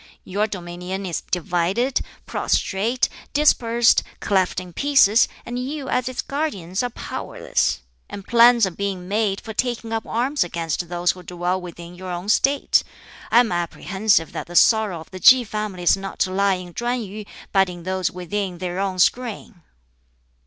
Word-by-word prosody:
Your 205 +3 -1
dominion 180 0 -6
is 175 -3 -3
divided, 180 - 0 0.2
prostrate, 225 +6 0 0.3
dispersed, 240 -6 +4 0.2
cleft 190 -2 +1
in 180 -1 -10
pieces, 270 -5 +4 0.2
and 240 +1 -4
you 270 +1 -4
as 255 0 0
its 255 - -4
guardians 205 - -3
are 245 - -1
powerless. - - -2 0.3
And 200 - -8
plans 235 -1 +6
are 190 - -3
being 190 -1 -4
made 205 -1 0
for 220 - -7
taking 235 -1 -2
up 225 0 -3
arms 260 +6 0
against 170 -1 -3
those 175 0 +1
who 185 - -11
dwell 180 +1 -2
within 175 0 -9
your 185 +1 -8
own 180 +3 -4
State. 275 +5 +3 0.5
I 240 - +6
am 230 - -1
apprehensive 180 +2 0
that - - -6
the 175 - -10
sorrow 210 -5 +4
of - - -15
the 185 - -8
Ki 255 +7 +7
family 210 -4 -4
is 175 - +5
not 195 0 -7
to 185 - +2
lie 195 0 +2
in 180 -1 -9
Chuen 240 +2 -2
yu, 210 +1 -7 0.3
but 195 -2 +3
in 175 -1 -9
those 185 0 -1
within 180 +1 -4
their 180 +1 -4
own 195 -1 -1
screen." 225 -1 0
195 Hz, 165 wpm, -22 LUFS, 180-235 Hz, 0.5 s, Ki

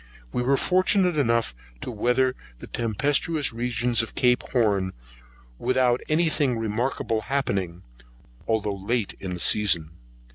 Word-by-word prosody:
We - - 0
were 135 +3 +2
fortunate 185 0 +2
enough 115 - +1 0.3
to - - -5
weather 125 +3 +1 0.2
the - - -10
tempestuous 140 +6 0
regions 120 0 0
of 115 - -7
Cape 125 -1 +3
Horn, 100 -6 +1 0.7
without 125 0 +2
any 165 +2 +2
thing 145 -6 +1
remarkable 115 0 -2
happening, 100 -9 -2 0.6
although 110 -2 0
late 100 +3 -2
in 90 -2 -5
the - - -7
season. 85 -5 +3
120 Hz, 130 wpm, -25 LUFS, 105-130 Hz, 0.7 s, Cape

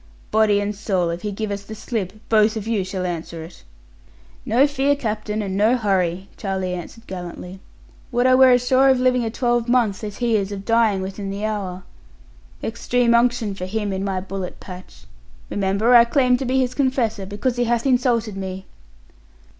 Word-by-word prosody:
Body 215 -1 +3
and 205 +1 -2
soul, 190 -5 -1
if 170 +1 -5
he 210 - -3
give 210 +1 -4
us 200 0 -3
the 215 +2 -9
slip, 210 -4 -4
both 215 0 +3
of 215 - -5
you 220 -4 0
shall 185 0 -4
answer 170 -2 -5
it.' 170 +2 -13 0.8
'No 245 +6 +4
fear, 285 0 +1
captain, 215 -4 -3
and 190 -1 -3
no 220 +5 +3
hurry,' 190 -4 0
Charlie 190 -2 -2
answered 180 +6 -8
gallantly, 180 0 -8 0.5
'would 245 0 +1
I 255 - +5
were 260 0 +7
as 250 0 +4
sure 265 +2 +4
of 260 -1 +4
living 250 -1 +2
a 225 - -1
twelvemonth 240 -3 +1
as 210 -2 -6
he 235 -3 +1
is 200 -1 -2
of 200 -1 -6
dying 225 -4 +2
within 195 +1 -5
the 200 +2 -3
hour! 195 -4 -4 0.8
Extreme 235 +1 +1
unction 235 -3 +2
for 185 -1 -5
him 205 0 -2
in 190 0 -3
my 195 -2 -1
bullet 190 0 -6
patch. 180 - -11 0.5
Remember, 200 +4 +1
I 235 -1 +9
claim 250 0 +3
to 265 - -4
be 260 +2 +1
his 255 -1 0
confessor, 250 -8 0
because 235 +5 -2
he 245 - +1
hath 235 +1 0
insulted 245 -5 +1
me.' 190 0 -6
215 Hz, 185 wpm, -21 LUFS, 195-240 Hz, 0.8 s, I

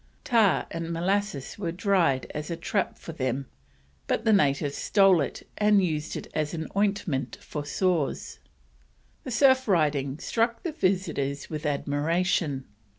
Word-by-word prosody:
Tar 225 -5 +3
and 165 0 -4
molasses 180 -3 -1
was 170 -4 -3
tried 180 - +2
as 150 0 -5
a 170 - -2
trap 185 +4 -2
for - - -8
them, 135 -3 -2 0.6
but 225 - -1
the 220 - +5
natives 145 -6 +2
stole 195 -4 +4
it 140 - -5
and 210 -2 +4
used 155 -2 -3
it - - -6
as 155 +1 -2 0.2
ointment 195 -10 0
for 150 - -6
sores. 165 0 -1 0.9
The - - -4
surf 260 +1 +4
riding 145 -7 +1
struck 230 +6 -1
the 340 - -2
visitors 180 - -1
with 155 0 -3
admiration. 145 0 0
170 Hz, 140 wpm, -27 LUFS, 145-200 Hz, 0.9 s, the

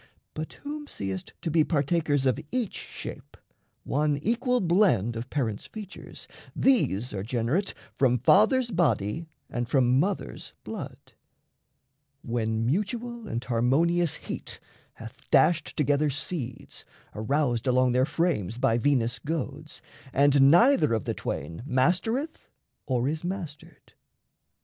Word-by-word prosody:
But 155 0 -6
whom 295 +1 -7
seest 95 - -5
to 165 - -1
be 160 0 +4
Partakers 145 -2 +1
of 130 +1 +2
each 245 -6 -1
shape, - - -8 0.5
one 145 +1 +1
equal 245 - +1
blend 170 - +2
Of 115 +3 -5
parents' 115 -8 -2
features, 210 -3 -9 0.3
these 125 - +2
are 95 - -3
generate 120 - -1 0.2
From 125 -2 +4
fathers' 225 - +4
body 160 - 0 0.2
and 120 -1 -3
from 130 -1 +3
mothers' 195 +5 -3
blood, - - -6 1.3
When 115 -1 -1
mutual 225 - -2
and 120 +2 -3
harmonious 145 +8 +2
heat - - -7 0.4
hath 115 0 -11
dashed 155 +4 +3
Together 145 0 +2
seeds, 135 -3 -5 0.3
aroused 120 +1 0
along 130 0 +3
their 130 +2 +2
frames 140 - -1
By 115 -1 +2
Venus' 120 -2 +1
goads, 150 -1 -5 0.3
and 140 0 +5
neither 235 - +5
of 110 - -3
the - - -1
twain 80 +6 -5
Mastereth 185 - 0 0.4
or 125 -1 +1
is 155 +2 -2
mastered. 175 -5 -7
145 Hz, 120 wpm, -27 LUFS, 120-175 Hz, 1.3 s, and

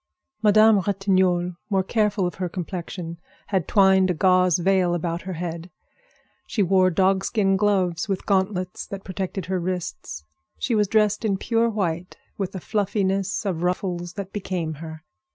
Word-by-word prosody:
Madame 215 0 +6
Ratignolle, 185 -3 +1
more 195 -2 +2
careful 210 -2 +1
of 175 - -2
her 180 - -1
complexion, 170 -1 -6 0.3
had 190 -5 0
twined 190 -2 +4
a 180 - +1
gauze 185 0 +4
veil 180 -1 +2
about 170 0 -2
her 190 - -6
head. 170 0 -5 0.8
She 210 - 0
wore 185 0 +4
dogskin 195 +2 +2
gloves, 190 -2 +1
with 195 -1 -2
gauntlets 190 -2 -1
that 195 -1 -7
protected 190 -1 -4
her 185 0 -1
wrists. 175 - -5 0.3
She 245 - -1
was 210 -2 +3
dressed 210 +1 +2
in 200 -3 +1
pure 230 +3 +1
white, 180 -5 -3 0.2
with 195 -1 -4
a - - -3
fluffiness 195 +1 -1
of 180 -5 -2
ruffles 180 -1 -2
that 195 -1 -7
became 180 -5 -3
her. 160 -1 -8
190 Hz, 155 wpm, -24 LUFS, 175-200 Hz, 0.8 s, Madame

